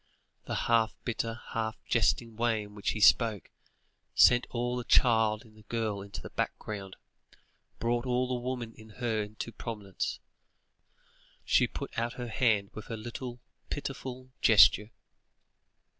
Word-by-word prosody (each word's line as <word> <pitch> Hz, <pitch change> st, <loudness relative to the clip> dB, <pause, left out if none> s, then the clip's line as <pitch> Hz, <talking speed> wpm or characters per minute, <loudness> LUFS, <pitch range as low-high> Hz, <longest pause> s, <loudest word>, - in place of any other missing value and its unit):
The -, -, -3 dB
half 115 Hz, -1 st, +3 dB
bitter, 115 Hz, -1 st, -3 dB
half 110 Hz, -1 st, -2 dB
jesting 115 Hz, -2 st, +1 dB
way 115 Hz, -1 st, +1 dB
in 105 Hz, 0 st, -12 dB
which 100 Hz, -1 st, -2 dB
he -, -, -1 dB
spoke, 110 Hz, -1 st, +4 dB, 0.6 s
sent 120 Hz, 0 st, +6 dB
all 120 Hz, 0 st, -1 dB
the 125 Hz, -, -3 dB
child 110 Hz, -3 st, +3 dB
in 110 Hz, -, -18 dB
the 110 Hz, -, -17 dB
girl 110 Hz, -2 st, -2 dB
into 100 Hz, 0 st, -8 dB
the -, -, -8 dB
background, 100 Hz, -3 st, -4 dB, 0.8 s
brought 120 Hz, +2 st, 0 dB
all 125 Hz, 0 st, +1 dB
the 130 Hz, -, -2 dB
woman 125 Hz, -3 st, -3 dB
in 110 Hz, 0 st, -15 dB
her 115 Hz, -3 st, 0 dB
into 105 Hz, +2 st, -6 dB
prominence; 105 Hz, -6 st, -4 dB, 1.3 s
she -, -, +4 dB
put -, -, -7 dB
out 115 Hz, +1 st, -1 dB
her 120 Hz, -1 st, -6 dB
hand 110 Hz, -4 st, +2 dB
with 110 Hz, -, -9 dB
a 115 Hz, -, -3 dB
little 120 Hz, +2 st, -7 dB, 0.3 s
pitiful 130 Hz, -2 st, -5 dB
gesture. 105 Hz, 0 st, +6 dB
115 Hz, 145 wpm, -30 LUFS, 110-120 Hz, 1.3 s, sent